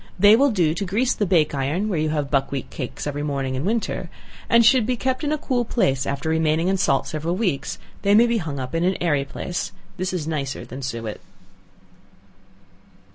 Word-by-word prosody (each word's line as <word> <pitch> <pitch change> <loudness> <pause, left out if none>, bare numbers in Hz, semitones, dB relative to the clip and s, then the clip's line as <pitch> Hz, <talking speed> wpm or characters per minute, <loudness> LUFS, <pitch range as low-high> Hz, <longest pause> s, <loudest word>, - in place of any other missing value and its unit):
They 205 +3 +7
will 280 +4 +4
do 175 -9 +2
to 170 - -3
grease 215 +7 +1
the 205 - -1
bake 165 -5 +3
iron 145 +9 -1
where 185 -7 -1
you 155 0 0
have 150 -2 -2
buckwheat 135 -1 -1
cakes 130 -4 -5
every 145 0 -3
morning 140 -3 -2
in 130 +2 -2
winter, 225 +2 -1 0.4
and 235 0 +6
should 235 -1 +5
be 250 -1 0
kept 260 +4 -1
in 295 - 0
a 305 - +1
cool 255 -4 0
place; 135 - 0
after 140 +2 -3
remaining 160 +2 +2
in 195 - +2
salt 135 -7 +2
several 160 +3 -2
weeks, 185 -9 -1 0.2
they 200 +1 +4
may 230 +2 +7
be 235 -1 +1
hung 150 -6 -4
up 130 +2 -5
in 165 +1 0
an 185 +1 +1
airy 145 -5 +1
place. 175 +5 -4 0.3
This 185 0 -2
is 180 -5 -3
nicer 140 -4 -3
than 130 +3 -8
suet. 115 -5 -4
165 Hz, 205 wpm, -23 LUFS, 140-210 Hz, 0.4 s, They